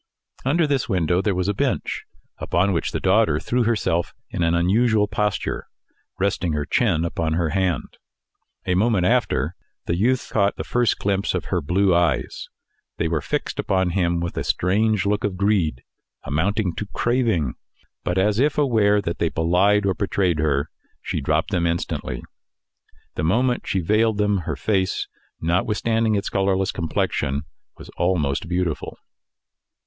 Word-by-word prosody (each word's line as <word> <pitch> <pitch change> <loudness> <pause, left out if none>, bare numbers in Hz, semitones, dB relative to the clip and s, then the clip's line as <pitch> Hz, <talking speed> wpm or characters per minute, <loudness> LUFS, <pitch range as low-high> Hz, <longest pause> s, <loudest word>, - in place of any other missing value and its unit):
Under 155 +6 +2
this 140 -5 0
window 90 -2 +1
there 100 -2 0
was 90 0 -1
a 100 - +1
bench, - - -2 0.3
upon 95 +3 +1
which 85 - -1
the - - -2
daughter - - +3
threw 125 -1 0
herself 105 -7 0 0.2
in - - -3
an 85 0 +2
unusual 105 +5 +3
posture, 105 -1 -2 0.5
resting 95 -3 0
her 75 -1 -1
chin 85 -7 +1
upon 80 -1 -1
her 85 -1 0
hand. 95 -4 -1 0.7
A 90 - +1
moment 100 -1 +2
after, - - +1 0.3
the 85 - 0
youth 120 +7 +1
caught 100 -2 +2
the - - -4
first 120 -3 +1
glimpse 100 -1 0
of 90 - -2
her 90 - +1
blue 90 +5 +2
eyes. 85 -5 0 0.5
They 80 - 0
were 80 -2 -1
fixed - - -3
upon 95 -2 +1
him 85 -2 +1
with 85 0 -4
a - - -1
strange 105 +2 +1
look 105 +2 0
of 100 -3 -1
greed, 95 -10 +1 0.4
amounting 95 +5 0
to 105 - -4
craving, 115 - +1 0.5
but, 90 - -1
as 105 +3 +2
if 145 +2 +2
aware 110 -8 +3
that 85 - -3
they 85 - +1
belied 95 +6 +2
or 95 - +2
betrayed 95 -4 0
her, 75 -1 0 0.3
she 80 - -2
dropped 75 +6 0
them 85 -3 +1
instantly. 85 -7 -3 0.9
The 75 - -3
moment 120 +9 +1
she 95 - 0
veiled 110 +4 +2
them, 105 -1 +2
her 75 - -1
face, 95 +8 0 0.3
notwithstanding 110 +6 +1
its 100 0 -1
colourless 95 -1 +1
complexion, 75 -4 -1 0.3
was - - -12
almost 85 -4 0
beautiful. 90 -3 -2
95 Hz, 155 wpm, -22 LUFS, 85-105 Hz, 0.9 s, daughter